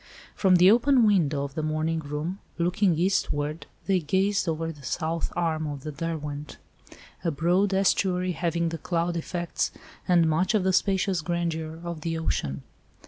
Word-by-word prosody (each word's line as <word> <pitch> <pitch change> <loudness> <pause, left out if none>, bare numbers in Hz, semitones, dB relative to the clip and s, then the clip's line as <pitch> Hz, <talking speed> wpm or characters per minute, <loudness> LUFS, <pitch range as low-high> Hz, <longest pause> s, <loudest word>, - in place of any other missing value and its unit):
From 190 -2 +4
the 180 +2 +7
open 245 +1 +4
window 155 -9 +2
of 140 -1 -5
the 155 - -3
morning 155 +1 -1
room, 155 +5 -4 0.2
looking 175 0 +2
eastward, 155 -4 0 0.2
they 190 -2 +2
gazed 190 +4 +1
over 165 +1 -2
the 150 -3 -13
south 160 +5 -2
arm 160 -2 0
of 145 -2 -6
the 155 - -4
Derwent; 150 - -5 0.7
a 170 - +1
broad 175 +6 +2
estuary 185 -1 +2
having 170 -1 -1
the 165 -1 -5
cloud 170 +1 -1
effects 170 +1 -2 0.4
and 175 -2 +4
much 175 +7 +1
of 205 - +2
the 190 0 +2
spacious 190 -2 +1
grandeur 160 -1 -3
of 170 -2 -5
the 165 +1 -2
ocean. 70 - -2
170 Hz, 160 wpm, -26 LUFS, 155-185 Hz, 0.7 s, the